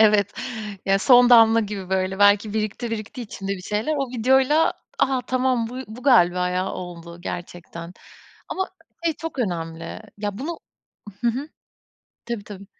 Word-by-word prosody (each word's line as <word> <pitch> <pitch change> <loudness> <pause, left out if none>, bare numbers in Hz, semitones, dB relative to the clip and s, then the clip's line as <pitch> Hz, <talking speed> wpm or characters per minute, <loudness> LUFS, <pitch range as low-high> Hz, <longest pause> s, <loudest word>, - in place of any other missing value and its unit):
Evet, 210 -2 +5 0.5
ya 195 0 +4
son 245 +2 +6
damla 225 -1 +7
gibi, 200 -3 -5
böyle, 190 0 0
belki 205 +1 +4
birikti 220 +2 -2
birikti 225 +3 -5
içimde 200 -2 -5
bir 185 -2 -6
şeyler. 215 +11 -1
O 275 -2 -1
videoyla 265 +6 +3 0.3
a, 265 -1 +2
tamam 255 -3 +1
bu 250 - -8
bu 235 +3 -10
galiba 180 -9 +4
ya 185 +1 -1
oldu 170 -1 -8
gerçekten. 175 -1 -7 0.6
Ama 380 0 -2 0.4
şey 325 -2 +2
çok 325 -4 -7
önemli, 165 -6 -3 0.2
ya, 205 -1 -3
bunu, 325 +5 -4 0.6
hı 240 - 0
hı, 265 +6 -2 0.8
tabii 235 -4 -4
tabii. 200 -2 -10
215 Hz, 150 wpm, -23 LUFS, 185-250 Hz, 0.8 s, damla